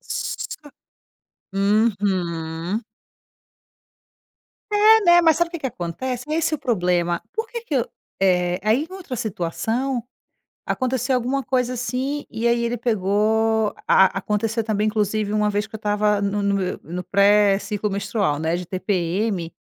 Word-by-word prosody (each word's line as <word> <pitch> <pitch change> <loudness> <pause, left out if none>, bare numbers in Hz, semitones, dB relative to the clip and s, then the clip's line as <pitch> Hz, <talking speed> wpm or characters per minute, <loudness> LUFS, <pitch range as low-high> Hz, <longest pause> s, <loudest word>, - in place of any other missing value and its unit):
Sô 295 -1 -5 0.8
Uhum. 195 -3 0 1.9
É, 430 +2 +6
né, 345 -1 +7
mas 320 -2 +5
sabe 345 0 +1
o - - -24
que 340 - -5
que 275 - -3
acontece? 250 - -5
É - - +1
esse 325 -1 +1
o - - -3
problema, 180 -7 0
por 445 +1 -2
que 470 - -5
que 320 -11 -4
eu, 240 - 0 0.3
eh, 180 -2 +2
aí 225 +9 +2
em - - -12
outra 350 -10 -6
situação 225 +6 -2 0.6
aconteceu 255 0 0
alguma 255 +3 -1
coisa 250 -1 0
assim, 260 +4 -3
e 225 +1 -1
aí 235 0 +2
ele 235 +1 -1
pegou, 220 0 +1
a 190 - +6
aconteceu 215 +3 -1
também 215 -1 0
inclusive 210 -1 0
uma 210 0 +2
vez 205 +1 -1
que 220 - -10
eu - - -4
estava 210 0 +1
no 200 +1 0
no 200 0 +1
me 185 -2 -2
no 180 +2 -5
pré 200 +2 +4
ciclo 210 0 -3
menstrual, 200 -6 -1
né, 160 +2 0
de 180 - -4
TPM, 185 0 -1
215 Hz, 155 wpm, -22 LUFS, 195-250 Hz, 1.9 s, né